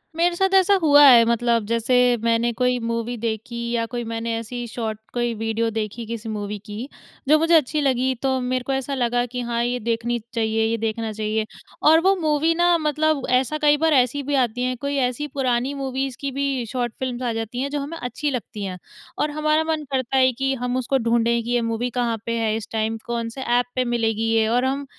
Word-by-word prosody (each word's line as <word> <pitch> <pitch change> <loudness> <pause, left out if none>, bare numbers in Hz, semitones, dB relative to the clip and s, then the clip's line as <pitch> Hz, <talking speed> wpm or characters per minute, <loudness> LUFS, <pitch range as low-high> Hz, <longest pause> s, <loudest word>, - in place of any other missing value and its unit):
मेरे 345 +1 +2
साथ 385 +2 +1
ऐसा 385 +1 +5
हुआ 290 -2 +7
है, 240 -4 +9
मतलब 235 -1 +1
जैसे 230 +2 +1 0.3
मैंने 230 +1 +2
कोई 250 0 +2
मूवी 230 +1 -3
देखी 225 +1 -4
या 230 -1 0
कोई 240 +1 -4
मैंने 230 0 -3
ऐसी 240 +2 -5
शॉर्ट 220 -2 -4
कोई 240 -1 0
वीडियो 225 +1 -1
देखी, 220 +1 -4
किसी 225 0 -6
मूवी 210 -1 -4
की, 215 +5 -6 0.4
जो 310 - +7
मुझे 330 +1 +2
अच्छी 300 0 +2
लगी 260 -1 +1
तो 265 -1 +1
मेरे 250 0 -1
को 270 - 0
ऐसा 270 +1 -2
लगा 245 -1 +1
कि 250 +1 -5
हाँ 235 0 0
ये 245 +1 -1
देखनी 235 +1 -1
चाहिए, 225 -1 0
ये 230 +1 0
देखना 225 0 -2
चाहिए 215 0 -2 0.4
और 320 +2 +7
वो 385 +2 +4
मूवी 310 +1 +2
ना 345 0 +4
मतलब 305 -2 0
ऐसा 305 +4 -2
कई 295 0 +4
बार 320 0 +2
ऐसी 260 +2 +2
भी 285 +1 -1
आती 245 +1 -3
है, 255 0 0
कोई 280 +3 -3
ऐसी 255 +3 -1
पुरानी 260 -1 -1
मूवीज़ 265 -2 -3
की 280 -1 -2
भी 275 -3 -1
शॉर्ट 240 -3 -2
फिल्म्स 255 -1 -3
आ 235 -2 -1
जाती 225 +3 -4
हैं 280 - -2
जो 290 0 -2
हमें 295 +4 -5
अच्छी 270 +2 -3
लगती 220 -4 -5
हैं 185 -2 -4 0.4
और 300 - 0
हमारा 305 +1 +1
मन 315 -1 -2
करता 265 0 0
है 260 0 +5
कि 270 +2 -1
हम 250 +1 -1
उसको 255 +2 0
ढूँढें 235 -1 +1
कि 235 - -7
ये 240 -1 +2
मूवी 230 +2 -2
कहाँ 230 -2 0
पे 230 0 -1
है 220 -1 0
इस 220 - -7
टाइम 220 0 -1
कौन 235 -1 -3
से 265 +4 -8
ऐप 245 -1 +2
पे 255 - +2
मिलेगी 225 -2 0
ये 220 -1 +3
और 245 +3 +2
हम 275 +2 -1
245 Hz, 220 wpm, -22 LUFS, 230-275 Hz, 0.4 s, है